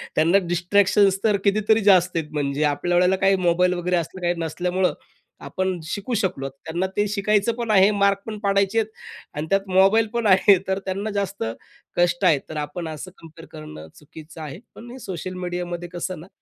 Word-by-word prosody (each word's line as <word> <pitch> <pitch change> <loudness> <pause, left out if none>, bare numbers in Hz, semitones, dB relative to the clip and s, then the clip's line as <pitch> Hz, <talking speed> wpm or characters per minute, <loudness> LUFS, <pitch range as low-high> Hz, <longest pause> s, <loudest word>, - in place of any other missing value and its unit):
त्यांना 165 +5 +4
डिस्ट्रॅक्शन्स 195 +2 +3
तर 210 -2 +3
कितीतरी 215 +2 +3
जास्त 180 -1 +3
आहेत. 155 -2 -3
म्हणजे 145 0 -1
आपल्या 175 +4 0
वेळेला 180 +2 +4
काही 195 +1 +3
मोबाईल 180 +1 +3
वगैरे 180 0 -1
असलं 175 +2 -5
काही 175 0 +1
नसल्यामुळं, 180 +3 -1 0.5
आपण 185 -2 -2
शिकू 205 +8 -4
शकलो. 185 -10 -1
त्यांना 160 +7 -4
ते 205 0 +2
शिकायचं 210 +2 +1
पण 230 -2 -1
आहे, 195 -1 +6
मार्क 200 -1 +2
पण 215 -1 -6
पाडायचे 200 +1 +1
आहेत 220 - -1 0.5
आणि 150 - -3
त्यात 195 0 +3
मोबाईल 195 +4 +4
पण 235 -2 0
आहे, 195 0 +6
तर 190 0 0
त्यांना 195 +3 -3
जास्त 200 - -3 0.5
कष्ट 175 +2 +2
आहे. 160 -6 +4
तर 155 - -6
आपण 160 +3 -6
असं 160 +4 -7
कंपेअर 165 0 -14
करणं 75 +1 -10
चुकीचं 160 +2 -13
आहे. 155 +4 -7 0.2
पण 240 +1 -11
हे 260 - -10
सोशल 185 -2 -6
मीडियामध्ये 175 0 -4
कसं 175 0 -5
ना, 175 - -12
185 Hz, 185 wpm, -23 LUFS, 170-200 Hz, 0.5 s, आहे